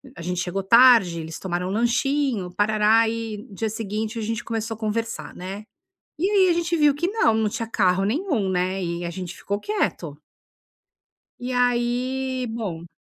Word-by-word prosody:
a 170 Hz, -, -9 dB
gente 180 Hz, +1 st, -3 dB
chegou 185 Hz, +2 st, -3 dB
tarde, 230 Hz, -5 st, +6 dB
eles 160 Hz, 0 st, -7 dB
tomaram 180 Hz, -1 st, -3 dB
lanchinho, 240 Hz, -2 st, 0 dB
parará 215 Hz, +2 st, +3 dB
e 225 Hz, -1 st, -3 dB
no -, -, -13 dB
dia 220 Hz, +2 st, -1 dB
seguinte 220 Hz, +1 st, -4 dB
a -, -, -3 dB
gente 225 Hz, +1 st, -3 dB
começou 225 Hz, 0 st, -3 dB
a -, -, -15 dB
conversar, 225 Hz, +1 st, -3 dB
né. 190 Hz, +3 st, -7 dB, 0.6 s
E 375 Hz, +5 st, +2 dB
aí 385 Hz, -3 st, +4 dB
a -, -, +4 dB
gente 340 Hz, 0 st, 0 dB
viu 295 Hz, -2 st, +5 dB
que 345 Hz, +5 st, -1 dB
não, 395 Hz, -, +2 dB
não 220 Hz, -1 st, +1 dB
tinha 230 Hz, +1 st, -4 dB
carro 195 Hz, -3 st, +2 dB
nenhum, 255 Hz, -, 0 dB
né, 185 Hz, +1 st, 0 dB
e 170 Hz, 0 st, -3 dB
a -, -, -2 dB
gente 180 Hz, 0 st, -6 dB
ficou 200 Hz, +1 st, -3 dB
quieto. 175 Hz, -, -2 dB, 1.2 s
E 250 Hz, +1 st, -4 dB
aí 250 Hz, +1 st, 0 dB
bom. 185 Hz, -8 st, -5 dB
220 Hz, 175 wpm, -23 LUFS, 190-245 Hz, 1.2 s, tarde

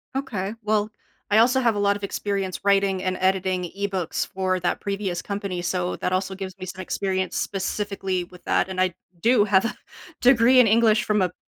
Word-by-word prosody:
Okay. 220 Hz, -7 st, -3 dB
Well, 210 Hz, 0 st, +1 dB, 0.4 s
I 215 Hz, +1 st, +5 dB
also 250 Hz, +3 st, +4 dB
have 235 Hz, -4 st, +2 dB
a -, -, -1 dB
lot 200 Hz, 0 st, +2 dB
of 205 Hz, -, -15 dB
experience 195 Hz, -2 st, -3 dB
writing 195 Hz, -2 st, +2 dB
and 185 Hz, 0 st, -1 dB
editing 185 Hz, -1 st, +1 dB
ebooks 190 Hz, -4 st, -2 dB
for 185 Hz, -1 st, 0 dB
that 175 Hz, -, 0 dB
previous 195 Hz, -3 st, -3 dB
company, 200 Hz, -3 st, -4 dB
so 180 Hz, 0 st, -2 dB
that 180 Hz, -, -2 dB
also 190 Hz, +1 st, -1 dB
gives 190 Hz, 0 st, -7 dB
me 185 Hz, -, -7 dB
some 185 Hz, +1 st, -7 dB
experience 190 Hz, 0 st, -2 dB
specifically 195 Hz, -1 st, -2 dB
with 180 Hz, 0 st, -16 dB
that, -, -, +1 dB
and 185 Hz, -1 st, -4 dB
I 185 Hz, 0 st, +3 dB
d -, -, -20 dB, 0.3 s
do 230 Hz, +3 st, +4 dB
have 195 Hz, 0 st, +3 dB
a -, -, -2 dB, 0.5 s
degree 250 Hz, 0 st, +6 dB
in 240 Hz, -, +4 dB
English 220 Hz, 0 st, +4 dB
from 210 Hz, -1 st, +1 dB
a 185 Hz, -, +2 dB
p 180 Hz, -, -24 dB
195 Hz, 205 wpm, -24 LUFS, 185-210 Hz, 0.5 s, degree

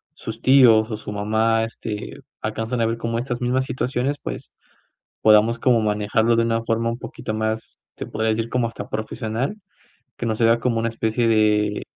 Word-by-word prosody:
sus -, -, -8 dB
tíos 120 Hz, -5 st, +6 dB
o 110 Hz, -, -2 dB
su 105 Hz, -, -8 dB
mamá, 110 Hz, +2 st, +1 dB
este, 115 Hz, -2 st, -6 dB, 0.2 s
alcanzan 115 Hz, +2 st, -2 dB
a 115 Hz, -, +3 dB
ver 115 Hz, 0 st, -1 dB
como 115 Hz, 0 st, -2 dB
estas 120 Hz, 0 st, -3 dB
mismas 125 Hz, +2 st, +1 dB
situaciones, 130 Hz, +2 st, -2 dB
pues, -, -, -7 dB, 0.7 s
podamos 110 Hz, +2 st, +5 dB
como 125 Hz, -3 st, +3 dB
manejarlo 110 Hz, +2 st, +1 dB
de 115 Hz, -, +3 dB
una 115 Hz, 0 st, 0 dB
forma 115 Hz, 0 st, 0 dB
un 115 Hz, -, -4 dB
poquito 110 Hz, -, -6 dB
más, 110 Hz, 0 st, -3 dB, 0.2 s
se -, -, -6 dB
podría 110 Hz, +1 st, -2 dB
decir 115 Hz, +1 st, -1 dB
como 120 Hz, -1 st, 0 dB
hasta 115 Hz, -, -8 dB
profesional, 110 Hz, -, -3 dB, 0.6 s
que 120 Hz, -, -4 dB
no 110 Hz, -1 st, 0 dB
se 115 Hz, -, +1 dB
vea 115 Hz, +1 st, +5 dB
como 120 Hz, -2 st, 0 dB
una 115 Hz, +1 st, 0 dB
especie 115 Hz, +1 st, 0 dB
de 105 Hz, -1 st, +2 dB
115 Hz, 185 wpm, -22 LUFS, 110-120 Hz, 0.7 s, tíos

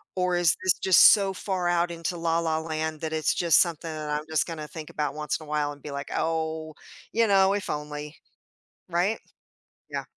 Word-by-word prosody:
or 180 Hz, -1 st, +1 dB
is 175 Hz, -3 st, +3 dB
this 185 Hz, -1 st, +4 dB
just 190 Hz, -2 st, +6 dB
so 195 Hz, -2 st, +1 dB
far 185 Hz, -2 st, -2 dB
out 175 Hz, 0 st, +1 dB
into 170 Hz, +1 st, -4 dB
la, 165 Hz, 0 st, +1 dB
la, 160 Hz, -1 st, 0 dB
land 160 Hz, -1 st, -4 dB
that 160 Hz, -1 st, -3 dB
it's 155 Hz, -1 st, +1 dB
just 170 Hz, -4 st, +4 dB
something 165 Hz, -1 st, 0 dB
that 155 Hz, -1 st, -5 dB
I'm 150 Hz, +1 st, -2 dB
just 160 Hz, +2 st, +1 dB
gonna 155 Hz, -2 st, -6 dB
think 155 Hz, -1 st, -9 dB
about 150 Hz, -2 st, -2 dB
once 150 Hz, +1 st, -3 dB
in -, -, -11 dB
a -, -, -17 dB
while, 150 Hz, -1 st, 0 dB
and 145 Hz, -1 st, -12 dB
be, 150 Hz, -, -8 dB
like, 140 Hz, 0 st, -6 dB
"Oh, 160 Hz, -1 st, -2 dB, 0.4 s
you 230 Hz, 0 st, +2 dB
know, 195 Hz, -1 st, +4 dB
if 205 Hz, -1 st, -3 dB
only" 150 Hz, +1 st, -5 dB, 0.7 s
right, 180 Hz, +6 st, 0 dB, 0.7 s
yeah. -, -, -4 dB
160 Hz, 205 wpm, -26 LUFS, 150-175 Hz, 0.7 s, just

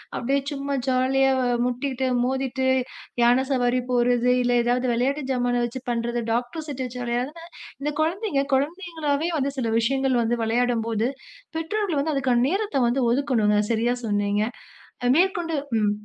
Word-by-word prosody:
அப்படியே 275 Hz, +3 st, 0 dB
சும்மா 280 Hz, 0 st, -3 dB
ஜாலி 260 Hz, +1 st, +2 dB
ஆக 260 Hz, -, +1 dB, 0.2 s
முட்டிட்டு, 260 Hz, +1 st, -1 dB, 0.2 s
மோதிட்டு 265 Hz, 0 st, -1 dB, 0.6 s
யானை 245 Hz, +3 st, +4 dB
சவாரி 250 Hz, -1 st, +2 dB
போகிறது 245 Hz, 0 st, +2 dB
இல்லை 245 Hz, 0 st, +2 dB
ஏதாவது 245 Hz, +1 st, +1 dB
விளையாட்டு 275 Hz, +5 st, 0 dB
ஜாமனை 245 Hz, -1 st, +1 dB
வைத்து 240 Hz, +2 st, -6 dB
பண்றது, 235 Hz, 0 st, -1 dB
டாகடர் 245 Hz, +7 st, -2 dB
செட் 265 Hz, -2 st, -4 dB
வைத்து 250 Hz, 0 st, -6 dB
விளையாடினால் 280 Hz, +8 st, -3 dB, 0.3 s
இந்தக் 295 Hz, +2 st, -3 dB
குழந்தைகள் 320 Hz, -4 st, -1 dB
குழந்தைங்களாகவே 320 Hz, 0 st, -1 dB
வந்து 280 Hz, 0 st, 0 dB
சில 230 Hz, -, -1 dB
விஷயங்கள் 265 Hz, +1 st, +1 dB
வந்து 230 Hz, +1 st, +1 dB
விளையாடும்போது 230 Hz, -1 st, +1 dB, 0.5 s
பெற்றோர்கள் 350 Hz, -1 st, -1 dB
வந்து 310 Hz, +2 st, 0 dB
அதற்கான 250 Hz, -3 st, +2 dB
நேரத்தை 400 Hz, -5 st, 0 dB
வந்து 260 Hz, +3 st, +1 dB
ஒதுக்கவேண்டும். 270 Hz, -1 st, +1 dB, 0.3 s
சரியா 235 Hz, +2 st, +1 dB
சொன்னீங்க. 205 Hz, 0 st, +1 dB, 0.8 s
மேற்கொண்டு 345 Hz, -3 st, +1 dB, 0.3 s
ம். 205 Hz, -, +2 dB
260 Hz, 140 wpm, -24 LUFS, 240-285 Hz, 0.8 s, யானை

